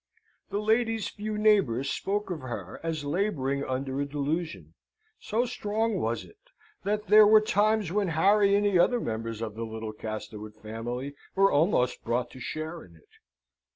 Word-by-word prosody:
That 200 - -2
lady's 225 +1 +1
few 215 0 -5
neighbours 195 - +3
spoke 205 0 -2
of 170 - -3
her 120 -9 -6
as 160 -3 -3
labouring 145 -5 0
under 135 +1 -2
a - - 0
delusion. 140 - -3 0.5
So 230 +4 0
strong 220 -2 -1
was 115 +1 -2
it, 420 - -19 0.4
that 210 +1 -1
there 215 0 +8
were 215 +1 +8
times 215 -2 +1
when 205 0 +1
Harry 200 +5 +4
and 205 0 +2
the 195 -3 +3
other 245 +7 +4
members 115 - -4
of 110 -2 -4
the 115 +2 -5
little 110 -1 -5
Castlewood 110 0 -7
family 120 +5 -5 0.2
were 195 0 +5
almost 145 -5 +2
brought 120 +1 -1
to 130 - -11
share 155 +6 -5
in 85 - -17
it. 80 - -23
160 Hz, 165 wpm, -28 LUFS, -, 0.5 s, there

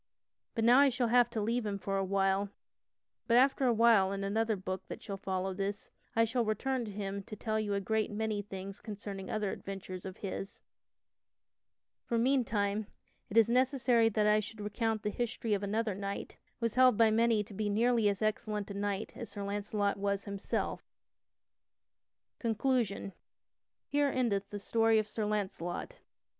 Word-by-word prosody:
But 225 - 0
now 240 +3 +7
I 285 0 +7
shall 250 -2 0
have 240 0 +5
to 235 - -3
leave 230 +3 0
him 205 -2 -2
for 195 0 -3
a 195 - +1
while 195 +1 +1 0.8
(but 235 -1 +5
after 270 +1 +4
a - - +5
while 220 -4 +5
in 195 0 -3
another 220 +2 +1
book 185 -1 -4
that - - -7
shall 200 - -6
follow 190 -1 -2
this, 200 +1 -4 0.2
I 230 0 +5
shall 240 +2 0
return 240 +4 -1
to 210 - -6
him 200 0 -4
to 215 - -9
tell 220 +1 -1
you 205 -2 -1
a - - +1
great 220 +2 0
many 215 0 -2
things 195 -1 -8
concerning 200 -3 -7
other 210 -2 -1
adventures 190 -2 -7
of 190 -1 -7
his), 195 0 -5 1.4
for 235 - -1
meantime 220 -5 +1 0.4
it 210 - -2
is 225 -1 +7
necessary 250 -2 +3
that 215 -1 +1
I 210 0 +5
should 215 +1 -7
recount 215 +1 -1
the 210 - -1
history 230 -1 -2
of 200 - 0
another 210 +1 0
knight, 200 +1 -5 0.2
who 230 - -1
was 230 - 0
held 255 -3 +5
by 225 -1 +5
many 225 -1 +3
to 205 - -13
be 210 +1 -1
nearly 225 +1 +3
as 200 +1 -2
excellent 210 -1 -1
a - - -4
knight 200 0 -2
as 235 - -7
Sir 205 - -6
Launcelot 205 0 -1
was 200 0 -1
himself. 200 -1 -2 1.6
CONCLUSION 225 -4 0 0.8
_Here 290 -1 +3
endeth 205 -6 0
the 205 - -5
story 225 +2 +3
of 215 -1 +1
Sir 215 0 -3
Launcelot. 200 - -3
210 Hz, 175 wpm, -32 LUFS, 200-230 Hz, 1.6 s, now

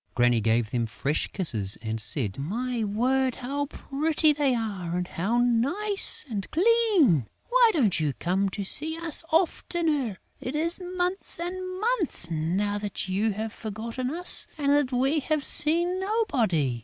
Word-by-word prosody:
Granny 120 -2 +2
gave 115 +1 0
them 120 -2 -1
fresh 135 +7 -2
kisses 110 - +2
and 110 -1 -4
said: 110 -4 +2
"My 235 - -3
word, 255 +5 0
how 280 +3 -4
pretty 305 +2 0
they 280 -3 +1
are 195 -7 -4
and 180 0 -3
how 200 +8 -2
nice 280 - +2
and 205 -6 -5
clean!... 365 - +3 0.2
Why - - +5
don't 230 - +2
you 150 -3 -1
come 185 - -1
to 200 +2 -5
see 315 +11 -1
us 330 -1 -1
oftener? 315 - 0 0.2
It 255 - -5
is 335 +4 0
months 360 +1 -2
and 370 +1 -5
months 415 - 0
now 185 +6 -1
that 205 -2 -5
you 205 +3 0
have 220 +2 -5
forgotten 230 +4 -5
us 350 +5 +4
and 285 -2 0
that 285 -2 +2
we 265 +5 +1
have 300 0 -1
seen 345 +4 +4
nobody...." 245 - 0
250 Hz, 155 wpm, -26 LUFS, -, 0.2 s, Why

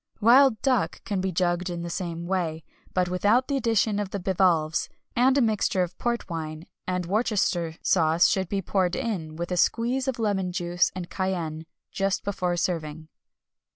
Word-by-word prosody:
Wild 240 +1 +6
duck 255 -5 +1
can 200 -3 -2
be 190 0 -1
jugged 180 +1 0
in 170 -1 -4
the 170 - -4
same 170 -2 -4
way, 170 -4 -2 0.3
but 180 -1 +1
without 205 +8 +2
the 280 - -1
addition 225 -4 +1
of 205 -2 -2
the 200 - -4
bivalves; 175 -4 +1 0.3
and 260 +3 +4
a - - +4
mixture 210 -4 +1
of 180 0 -6
port 235 0 -1
wine 160 -2 -5 0.2
and 180 -1 -1
Worcester 190 -5 0
sauce 165 -1 +3
should 190 -3 0
be 195 -1 -1
poured 180 -1 0
in, 165 -9 -3
with 170 +2 -5
a 180 - 0
squeeze 245 +8 +1
of 265 -1 -1
lemon 200 -5 0
juice 175 -1 +1
and 180 -2 -6
cayenne, 165 -4 -3 0.2
just 195 0 -1
before 180 -3 -1
serving. 160 -3 -3
185 Hz, 175 wpm, -26 LUFS, 170-210 Hz, 0.3 s, Wild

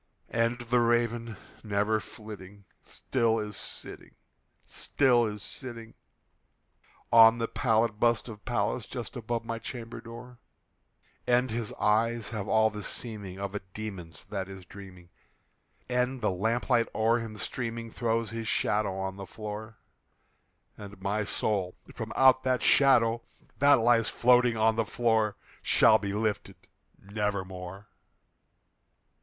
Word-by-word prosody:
And 115 +1 +1
the 120 +1 +1
Raven, 115 -2 +1 0.3
never 105 +1 +1
flitting, 100 -2 -11 0.2
still 115 -3 0
is 105 -2 -4
sitting, - - -7 0.5
still 120 -4 +2
is 105 -2 -6
sitting 115 +3 -8 1.2
On 115 0 +8
the 115 -1 -1
pallid 110 -4 +1
bust 120 0 +2
of 105 -4 -10
Pallas - - -1
just - - -6
above 115 0 -3
my 115 -1 -4
chamber 115 0 -7
door; 120 +1 -11 0.9
And 125 0 +3
his 115 -1 -3
eyes 115 +2 +1
have 105 -3 -4
all 110 0 +3
the 105 0 -6
seeming 105 -4 -4
of 100 0 -4
a 105 - -2 0.2
demon's 95 -8 -6
that 95 -2 -5
is 95 -2 -10
dreaming, 90 -2 -13 0.8
And 125 +1 0
the 120 - 0
lamp 115 +8 -1
light 120 -2 +4
o'er 115 +2 +3
him 110 -2 -7
streaming 115 +1 -4
throws 115 -1 -1
his 115 -1 -5
shadow 105 -3 +1
on 95 0 -4
the 95 -1 -8
floor; 110 +2 -7 1.0
And 100 -1 -10
my 100 +2 -1
soul 100 -3 -1 0.2
from - - -6
out 130 -1 +6
that 130 -1 0
shadow 120 -4 +5 0.4
that 145 +2 +7
lies 115 -1 +3
floating 125 -1 +4
on 110 0 +3
the 115 - +3
floor 110 -2 +1 0.3
Shall - - +5
be 100 -1 -3
lifted 105 -2 -2 0.4
nevermore! 100 -2 -4
110 Hz, 135 wpm, -29 LUFS, 105-120 Hz, 1.2 s, On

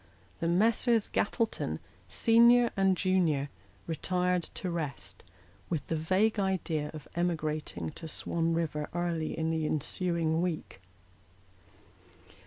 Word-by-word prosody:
The 165 - -1
Messrs. 225 +5 +3
Gattleton, 225 +2 -1 0.3
senior 235 +1 +5
and 195 -2 +3
junior, 170 -7 +1 0.4
retired 180 +2 0
to 185 - -3
rest, 155 -5 -5 0.5
with 160 -5 -2
the 165 - +1
vague 190 +7 +2
idea 175 -6 -1
of 155 -2 -10
emigrating 155 - -2
to 160 - -8
Swan 165 +1 -1
Eiver 150 -3 -1
early 170 -2 -1
in 160 0 0
the 160 -1 0
ensuing 165 +2 0
week. 165 - -3
170 Hz, 110 wpm, -30 LUFS, 155-190 Hz, 0.5 s, senior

